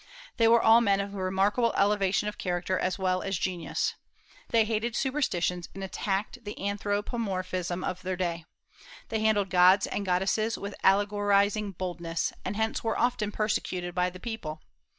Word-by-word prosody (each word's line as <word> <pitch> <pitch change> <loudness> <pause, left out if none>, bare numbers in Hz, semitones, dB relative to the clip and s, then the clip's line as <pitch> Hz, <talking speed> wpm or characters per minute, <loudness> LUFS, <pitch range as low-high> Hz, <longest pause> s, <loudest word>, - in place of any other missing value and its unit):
They 230 -2 +5
were 230 0 +5
all 225 +1 +7
men 200 -3 +3
of 200 0 -3
remarkable 195 +5 +1
elevation 200 0 +2
of 210 - -5
character 180 0 -1
as 185 - -1
well 185 -1 0
as 195 -2 -2
genius. 180 -2 -2 0.6
They 225 -2 +4
hated 225 +1 -1
superstitions, 180 - -1
and 195 - -6
attacked 200 +5 -3
the 205 -1 -7
anthropomorphism 195 -3 -2
of 185 0 -3
their 185 0 -2
day. 170 -2 -2 0.6
They 220 - -1
handled 210 -3 +2
gods 185 +2 +6
and 205 - -3
goddesses 195 +4 +1
with 200 +1 -6
allegorizing 205 +1 +2
boldness, 170 -2 -3
and 205 - -3
hence 220 +1 -1
were 225 -1 0
often 240 -4 +1
persecuted 185 -4 -2
by 180 0 +1
the 185 0 -11
people. 175 -9 -6
200 Hz, 155 wpm, -28 LUFS, 185-215 Hz, 0.6 s, all